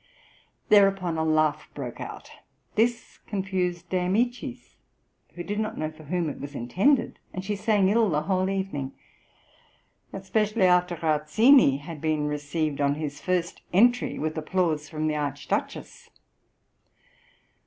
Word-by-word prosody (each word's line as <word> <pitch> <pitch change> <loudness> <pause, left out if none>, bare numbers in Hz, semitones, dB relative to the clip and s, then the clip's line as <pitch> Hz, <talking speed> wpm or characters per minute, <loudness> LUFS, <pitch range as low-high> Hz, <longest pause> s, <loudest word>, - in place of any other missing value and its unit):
Thereupon 195 -4 +4
a - - +1
laugh 155 -1 +1
broke 125 -4 -6
out; - - -8 0.4
this 235 +2 0
confused 185 -3 -2
De 185 - 0
Amicis, 230 +7 -2 0.6
who 175 - -5
did 205 +3 -3
not 220 +1 -3
know 155 0 -2
for 155 0 -15
whom 175 +2 -1
it 145 - -5
was 145 0 -8
intended, 200 - +1
and 185 0 -5
she 205 +1 -1
sang 205 -1 +2
ill 220 +1 +3
the 150 -2 0
whole 185 +2 0
evening, 190 -9 -3 1.2
especially 210 +2 0
after 180 -1 +3
Rauzzini 160 - +4
had 155 0 -8
been 155 -2 0
received 150 0 -2
on 140 0 +2
his 150 -2 -5
first 180 -2 -1
entry 245 +6 +3
with 155 0 -2
applause 155 -2 -1
from 155 0 -3
the 155 -1 0
Archduchess. 145 -1 -4
175 Hz, 135 wpm, -26 LUFS, 150-195 Hz, 1.2 s, Thereupon